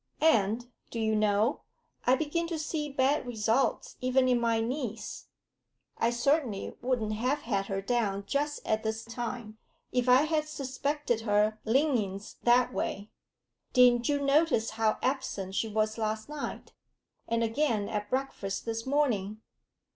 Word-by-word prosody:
And, 240 -5 +2 0.2
do 230 - -5
you 220 -1 +1
know, 215 +4 +2 0.5
I 255 - +6
begin 315 +4 -1
to 335 -1 -3
see 305 -1 -3
bad 275 0 +1
results 230 +2 0
even 255 0 +3
in 245 -1 +3
my 230 -1 +2
niece. 230 -1 -4 0.7
I 230 - +3
certainly 240 -3 0
wouldn't 240 -4 0
have 255 +7 0
had 200 -6 -1
her 195 -1 -3
down 205 -4 0
just 290 +6 -2
at 220 0 +1
this 220 +1 -3
time 235 -2 -5 0.3
if 250 0 +1
I 255 +3 +7
had 310 -1 0
suspected 280 -3 -2
her 215 0 +2
leanings 225 -6 0
that 245 +1 +4
way. 200 +2 -3 0.6
Didn't 245 -1 +5
you 285 -1 +2
notice 280 -5 +2
how 220 -1 +1
absent 255 -8 -2
she 225 - 0
was 215 +1 0
last 215 0 -2
night, 300 -1 -6 0.5
and 230 0 +1
again 225 -3 +1
at 210 -1 -3
breakfast 260 -7 -2
this 225 +1 -3
morning? 225 -8 +1
235 Hz, 145 wpm, -29 LUFS, 215-275 Hz, 0.7 s, I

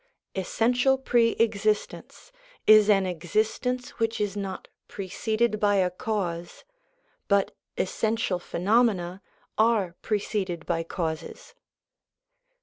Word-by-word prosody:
Essential 245 +7 +2
pre 240 -3 +2
existence 215 - -1 0.3
is 215 -1 +7
an 195 -2 +4
existence 215 +8 -1
which 225 0 0
is 205 -1 -1
not 195 -2 -5 0.2
preceded 215 +3 -1
by 205 -1 +3
a 185 -2 +2
cause, 175 -4 -4 0.6
but 200 -1 +2 0.2
essential 215 -1 0
phenomena 190 -1 +1 0.4
are 215 -6 +2
pre 215 - 0
ceded 190 -6 -3
by 165 -1 0
causes. 165 -1 -5
205 Hz, 100 wpm, -26 LUFS, 180-225 Hz, 0.6 s, is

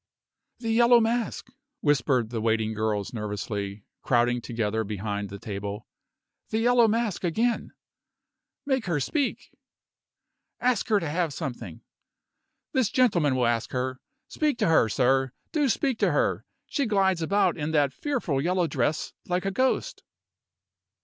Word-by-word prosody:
"The 230 -2 -3
Yellow 235 +1 +6
Mask!" 230 0 -1 0.3
whispered 130 -5 +2
the 115 -2 -2
waiting 110 -1 +1
girls 110 -1 -2
nervously, 105 -2 -4 0.2
crowding 120 0 +2
together 110 -2 -1
behind 105 -1 -4
the 100 - -7
table. 100 +1 -5 0.6
"The 220 - -1
Yellow 240 0 +4
Mask 220 -4 -1
again!" 225 +7 0 0.9
"Make 265 -6 0
her 165 -4 +1
speak!" 280 - -2 1.1
"Ask 245 -3 +1
her 210 -2 +3
to 165 - -4
have 165 0 -1
something!" 115 -10 -6 0.9
"This 255 -5 +2
gentleman 175 - +3
will 125 -1 +2
ask 115 0 0
her. 130 0 -2 0.3
Speak 300 -5 0
to - - +1
her, 140 -8 +4
sir. 130 +2 +2 0.2
Do 295 -3 +1
speak 255 +2 0
to - - +3
her! - - 0 0.2
She 280 -4 -1
glides 190 -4 +2
about 200 +5 +2
in 150 -2 -3
that 145 -4 +2
fearful 225 - -1
yellow 180 +3 +1
dress 145 0 -1
like 180 +1 -1
a 195 - 0
ghost." 260 - 0
150 Hz, 140 wpm, -26 LUFS, -, 1.1 s, Yellow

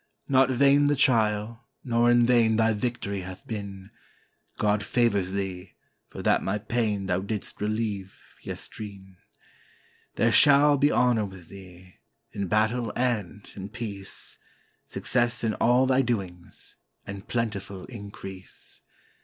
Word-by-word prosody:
"Not 135 -1 +4
vain 140 +3 +4
the 145 0 +3
trial, 115 -3 +1 0.2
nor 120 -1 +2
in 120 0 +5
vain 115 -2 +4
thy 110 0 +3
victory 105 -3 -3
hath 95 0 -9
been; 100 -2 -7 0.7
God 105 0 +1
favors 100 -7 +1
thee, 95 -2 -4 0.3
for - - -8
that - - +3
my 95 +2 -1
pain 105 -2 -1
thou 90 -1 0
didst 100 +2 -5
relieve 105 -2 -3 0.2
yestreen. 95 -3 -8 1.0
There 115 - +3
shall 145 +2 +6
be 145 +1 +4
honor 120 -4 +2
with 95 -4 -12
thee, 90 -2 -14 0.3
in 100 -2 -3
battle 110 +3 +1
and 110 -5 -2
in 100 0 -7
peace. 105 -4 -7 0.5
Success 120 -1 0
in 110 -1 +1
all 125 +4 +3
thy 130 0 +3
doings, 95 -8 -5 0.3
and 100 0 -8
plentiful 100 -5 -3
increase. 100 -4 -10
110 Hz, 130 wpm, -26 LUFS, 100-120 Hz, 1.0 s, shall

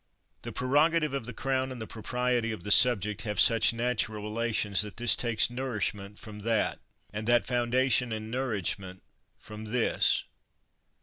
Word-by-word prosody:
The - - -7
prerogative 150 +3 +2
of 135 -4 -4
the - - -4
crown 130 +2 -2
and 130 - -7
the 110 - -5
propriety 120 +2 -2
of 110 -6 -7
the 105 - -2
subject 105 -3 +4
have 105 -2 -4
such 115 -1 +5
natural 115 -3 -2
relations 110 -2 0
that 105 -1 -7
this 120 -1 +3
takes 115 -2 +1
nourishment 105 -5 -3
from 110 -3 -10
that, 110 +1 0 0.3
and 105 +1 -5
that 120 0 +3
foun 120 -2 -1
dation 130 -1 +2
and 110 0 -5
nourishment 100 -7 -3 0.3
from 110 0 -10
this. 115 +2 +1
115 Hz, 160 wpm, -28 LUFS, 105-125 Hz, 0.3 s, such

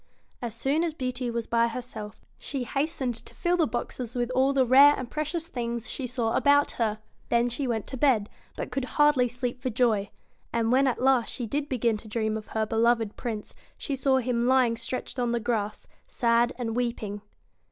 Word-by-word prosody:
' - - -42
As 235 -2 -4
soon 280 +7 +1
as 330 -3 -2
Beauty 255 -2 -3
was 235 -1 -2
by 235 0 +2
herself, 230 -3 -7
she 275 -3 -3
hastened 275 -1 -1
to 230 - -9
fill 350 +1 +1
the 325 - +3
boxes 240 +1 -4
with 245 0 -1
all 265 +2 +3
the 270 -2 +3
rare 280 +4 +7
and 255 -2 -6
precious 305 +2 -2
things 235 -6 -4
she 265 - -3
saw 235 -2 -1
about 285 0 +4
her. 215 -2 +1 0.3
Then 235 +1 +3
she 260 +3 -2
went 225 -3 -1
to 265 - -5
bed, 240 -6 +3 0.3
but - - -4
could 260 0 -2
hardly 295 -4 +5
sleep 245 +1 -4
for 260 - -1
joy. 220 -4 +1 0.4
And 230 0 +1
when 270 +2 +4
at 255 0 -1
last 260 -3 +3
she 245 - -3
did 285 +6 -2
begin 235 -4 +1
to 215 - -12
dream 220 0 -1
of 215 -1 -6
her 220 0 -1
beloved 225 0 +1
Prince, 220 -4 -5 0.2
she 280 - -3
saw 265 0 +2
him 240 -1 0
lying 255 -3 +4
stretched 240 +2 -5
on 240 -1 0
the 235 - +1
grass, 220 -3 -2 0.2
sad 235 0 +2
and 230 -3 -3
weeping. 230 -4 -2
245 Hz, 205 wpm, -27 LUFS, 230-265 Hz, 0.4 s, rare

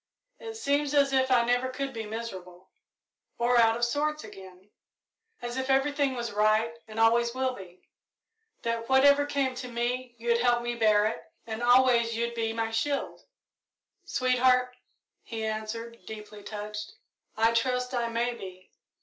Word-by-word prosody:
It 450 -1 -7
seems 290 -5 0
as 280 -1 +3
if 260 0 +3
I 240 -2 +4
never 245 +2 +1
could 270 +1 -4
be 225 -2 -5
miserable 190 -5 -8 0.7
or 240 +1 +3
out 225 0 +4
of 240 - +2
sorts 300 +5 -1
again; 190 -2 -13 0.7
as 240 +1 -4
if 260 +1 -3
everything 275 0 +2
was 235 -1 -3
right 215 +2 +2
and 220 0 -7
always 235 +1 +3
would 260 -1 -1
be; 185 -3 -13 0.8
that 230 0 -2
whatever 280 +2 +5
came 275 -2 0
to 250 0 -6
me 245 +1 -3
you'd 235 0 +1
help 240 -1 +2
me 240 0 -2
bear 215 -3 +3
it, 220 - -4
and 220 0 -5
always 240 -2 +4
you'd 235 +1 -1
be 225 -1 -1
my 225 0 -2
shield." 275 +6 -2 0.8
"Sweetheart," 255 -4 +2 0.5
he 225 -1 -5
answered, 220 +2 -5
deeply 210 -1 -9
touched, 210 0 -6 0.4
"I 225 +1 +3
trust 250 +2 0
I 240 -2 0
may 235 +1 -1
be. 185 -4 -11
235 Hz, 155 wpm, -28 LUFS, 225-255 Hz, 0.8 s, whatever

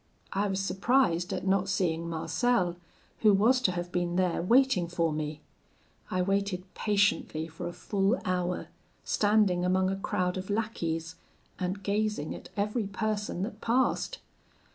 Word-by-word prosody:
I 200 +2 +1
was 195 -1 -1
surprised 190 -2 +2
at - - -3
not 195 0 +2
seeing 170 -3 0
Marcel, 175 +2 +1 0.4
who 215 - +6
was 240 +6 +4
to 190 - +3
have 175 0 -4
been 175 -1 -1
there 180 -2 +1
waiting 230 -2 +4
for 165 -2 0
me. 150 0 -4 0.7
I 185 0 +1
waited 195 -1 0
patiently 205 -6 +1
for 160 +1 -6
a - - -4
full 200 +5 0
hour, 180 -1 -1 0.3
standing 205 -4 +2
among 185 +1 +2
a - - -1
crowd 185 -2 -1
of 190 - -7
lackeys, 170 -6 -2 0.4
and 185 +2 -3
gazing 205 -5 -1
at - - -10
every 210 +1 0
person 205 -2 -2
that 220 - -6
passed. 260 - +1
190 Hz, 145 wpm, -29 LUFS, 175-210 Hz, 0.7 s, who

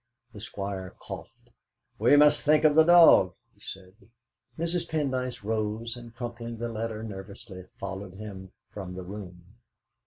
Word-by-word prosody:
The - - -9
Squire 95 -2 -5
coughed. - - -10 0.5
"We 120 +6 +6
must 150 0 +6
think 150 +1 +4
of 155 -1 +6
the 160 +1 +7
dog!" 165 - +7 0.2
he - - -30
said. 95 -1 -10 0.6
Mrs. 170 +1 -1
Pendyce 130 -7 -2
rose, 110 +2 -2
and 120 -1 -11
crumpling 115 -1 -6
the 120 +1 -3
letter 110 -1 -4
nervously, 95 -2 -9
followed 95 -1 -6
him 95 -2 -9 0.2
from 95 -3 -7
the 95 - -6
room. 90 0 -10
110 Hz, 145 wpm, -28 LUFS, 95-125 Hz, 0.6 s, the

